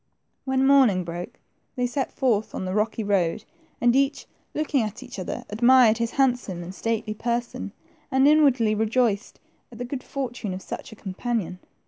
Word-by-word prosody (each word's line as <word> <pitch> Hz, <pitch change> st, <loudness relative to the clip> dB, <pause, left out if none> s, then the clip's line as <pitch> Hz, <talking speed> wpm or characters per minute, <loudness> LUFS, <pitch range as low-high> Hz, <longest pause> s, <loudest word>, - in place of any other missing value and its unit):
When 265 Hz, 0 st, +2 dB
morning 260 Hz, -10 st, +5 dB
broke, 170 Hz, +1 st, -7 dB, 0.4 s
they 250 Hz, -2 st, 0 dB
set 260 Hz, +2 st, -2 dB
forth 225 Hz, -5 st, 0 dB
on -, -, -3 dB
the 185 Hz, -, -3 dB
rocky 215 Hz, +2 st, 0 dB
road, 200 Hz, -1 st, 0 dB, 0.3 s
and 240 Hz, +1 st, +3 dB
each, 275 Hz, +1 st, +1 dB, 0.3 s
looking 300 Hz, -3 st, +1 dB
at 215 Hz, -2 st, -3 dB
the -, -, -11 dB
other, -, -, -5 dB
admired 235 Hz, +1 st, +5 dB
his 230 Hz, 0 st, 0 dB
handsome 245 Hz, -10 st, 0 dB
and 180 Hz, +2 st, -8 dB
stately 225 Hz, +1 st, -2 dB
person, 235 Hz, +2 st, -3 dB, 0.4 s
and 265 Hz, 0 st, +4 dB
inwardly 270 Hz, -8 st, +4 dB
rejoiced 220 Hz, 0 st, 0 dB, 0.3 s
at 230 Hz, -, -11 dB
the 245 Hz, -, -4 dB
good 255 Hz, +1 st, -5 dB
fortune 245 Hz, -9 st, -4 dB
of 185 Hz, -, -7 dB
such -, -, -7 dB
a -, -, -10 dB
companion. 200 Hz, -2 st, -3 dB
235 Hz, 165 wpm, -25 LUFS, 210-260 Hz, 0.4 s, morning